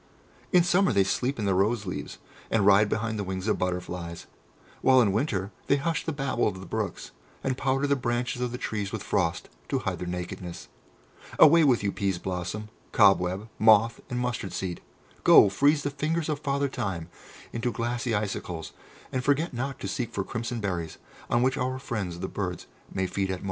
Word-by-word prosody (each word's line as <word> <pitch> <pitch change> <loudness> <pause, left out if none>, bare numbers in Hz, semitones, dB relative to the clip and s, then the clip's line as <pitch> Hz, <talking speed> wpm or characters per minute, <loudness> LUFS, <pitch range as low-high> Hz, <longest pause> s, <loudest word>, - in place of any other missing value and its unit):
In 180 -4 +6
summer 180 +2 +3
they 100 - +4
sleep 125 +7 -1
in 110 - -2
the 100 - +2
roseleaves, 100 0 -1 0.3
and 105 -3 +2
ride 100 +1 +6
behind 110 -1 -1
the - - -1
wings 95 +1 -4
of 105 - +1
butterflies, 90 -2 -3 0.6
while 130 -1 +6
in 110 -5 +4
winter 100 -3 -1 0.2
they 140 - +4
hush 160 +3 -1
the 160 - -1
babble 140 -4 0
of 95 -3 -3
the 95 - -9
brooks, - - -4 0.3
and 130 -1 0
powder 135 +1 0
the 140 0 +3
branches 125 -1 -2
of 125 -1 -1
the 125 - -4
trees 105 -5 -3
with - - -4
frost - - 0 0.2
to - - +1
hide - - -3
their 90 - -4
nakedness. 90 0 -6 0.7
Away 165 +2 +8
with 125 -7 +3
you, 100 - +1
Peas 95 -2 -1
blossom, 95 +4 -4 0.2
Cobweb, 95 +2 +4
Moth, 110 +1 +5
and 125 - -3
Mustard 120 -6 -2
seed! 90 -2 -4 0.4
Go, 100 - +8
freeze 145 +9 +3
the 145 - -1
fingers 155 +3 -1
of 150 -2 -1
Father 140 -1 0
Time 95 -10 -3 0.5
into 115 +1 -1
glassy 120 0 -1
icicles, 100 -5 -3 0.4
and 130 -1 -1
forget 145 +5 +1
not 130 +2 -3
to - - -3
seek 115 +4 -3
for 100 - -1
crimson 120 +2 -4
berries 90 -6 -3 0.3
on 120 - +3
which 130 +2 +2
our 130 0 -1
friends 100 -9 -4
the 95 - -2
birds 90 -3 -4 0.3
may 95 - -1
feed 95 +2 -1
at - - 0
morn!" 90 - -5
110 Hz, 190 wpm, -27 LUFS, 95-130 Hz, 0.7 s, Away